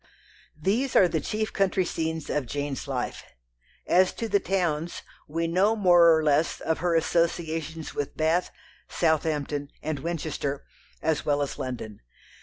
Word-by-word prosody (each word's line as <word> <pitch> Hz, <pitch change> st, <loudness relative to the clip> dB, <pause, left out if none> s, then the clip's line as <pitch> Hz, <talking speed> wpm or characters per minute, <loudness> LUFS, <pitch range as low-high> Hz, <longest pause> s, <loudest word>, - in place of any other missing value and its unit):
These 225 Hz, -, 0 dB
are 185 Hz, -, +7 dB
the 160 Hz, -3 st, -1 dB
chief 215 Hz, +5 st, -2 dB
country 190 Hz, -2 st, +1 dB
scenes 160 Hz, -2 st, -3 dB
of 145 Hz, -4 st, -1 dB
Jane's 145 Hz, +1 st, -3 dB
life. 130 Hz, -3 st, -3 dB, 0.6 s
As 185 Hz, +1 st, +4 dB
to 230 Hz, -, -4 dB
the 200 Hz, -1 st, +3 dB
towns, 175 Hz, -4 st, -1 dB, 0.2 s
we 165 Hz, +3 st, -1 dB
know 190 Hz, +6 st, +3 dB
more 175 Hz, -5 st, +6 dB
or 160 Hz, -, 0 dB
less 150 Hz, +2 st, +2 dB
of 160 Hz, -, -1 dB
her 175 Hz, -1 st, +1 dB
associations 165 Hz, -1 st, -1 dB
with 145 Hz, -, -4 dB
Bath, 160 Hz, +3 st, +2 dB, 0.4 s
Southampton, 150 Hz, -3 st, 0 dB
and 155 Hz, -3 st, -2 dB
Winchester, 145 Hz, -3 st, -3 dB, 0.4 s
as 160 Hz, -2 st, +1 dB
well 145 Hz, -1 st, +1 dB
as 140 Hz, -, -5 dB
London. 115 Hz, -5 st, -5 dB
160 Hz, 145 wpm, -26 LUFS, 145-175 Hz, 0.6 s, are